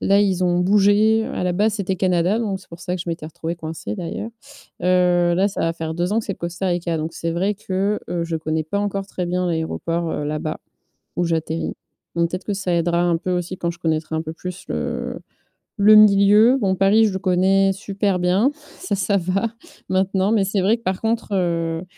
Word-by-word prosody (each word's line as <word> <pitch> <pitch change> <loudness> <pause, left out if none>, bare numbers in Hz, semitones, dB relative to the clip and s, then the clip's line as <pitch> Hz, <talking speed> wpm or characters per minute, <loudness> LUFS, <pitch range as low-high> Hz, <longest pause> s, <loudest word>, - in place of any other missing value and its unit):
là, 200 +1 +3
ils 190 -3 +1
ont 175 0 +2
bougé. 210 +3 +4
Heu, - - -6
à - - -2
la 180 - +1
base, 210 +4 +1
c'était 195 -3 -1
Canada, 180 +3 +1
donc 200 -4 -2
c'est - - -19
pour 170 +1 -11
ça 180 0 -3
que 175 - -4
je - - -7
m'étais 165 -2 -4
retrouvée 160 +1 -5
coincée, 160 -10 -6
d'ailleurs. 175 +6 -5 0.5
Heu, 180 -1 +3
là, 190 +3 +3
ça 195 - -5
va 165 - +1
faire 160 -1 -4
2 175 +4 -1
ans 225 - +2
que - - -10
c'est 200 - -1
le - - -30
Costa 175 +2 -4
Rica. 175 -1 -1
Donc, 160 +1 -4
c'est 165 - -3
vrai 190 +5 0
que, 195 +1 -1
heu, 170 -1 -2
je 165 -1 -3
connais 160 0 -2
pas 180 +6 -2
encore 200 -1 -2
très 180 -2 -4
bien 180 +1 -1
l'aéroport, 165 0 -2
heu, 145 - -3
là-bas, 155 +1 -3 0.6
où 175 - +1
j'atterris. 165 -1 -2 0.4
Donc 170 0 +1
peut-être 185 +1 -5
que 205 - -1
ça 190 -3 -1
aidera 170 0 +1
un 175 -1 +2
peu 185 - -4
aussi, 180 +1 -2
quand 170 - -1
je 170 - -10
connaîtrai 160 -2 -1
un 160 - -1
peu 160 0 -6
plus 180 +2 -7
le - - -3 0.6
le 210 +2 +7
milieu. 210 +4 +6
Bon, 190 -2 +1
Paris, 200 +4 +4
je 205 - -1
le 190 - -1
connais 195 +1 +3
super 200 -1 -1
bien, 185 +9 +3 0.3
ça, 370 - -2
ça 200 +1 +1
va, 190 +6 0 0.4
maintenant. 190 +2 +1
Mais 205 -3 +3
c'est 195 0 0
vrai 215 +5 +3
que, 230 - -24
par 185 -4 -2
contre, 225 +1 -1
heu, 165 -2 -1
180 Hz, 225 wpm, -21 LUFS, 170-200 Hz, 0.6 s, le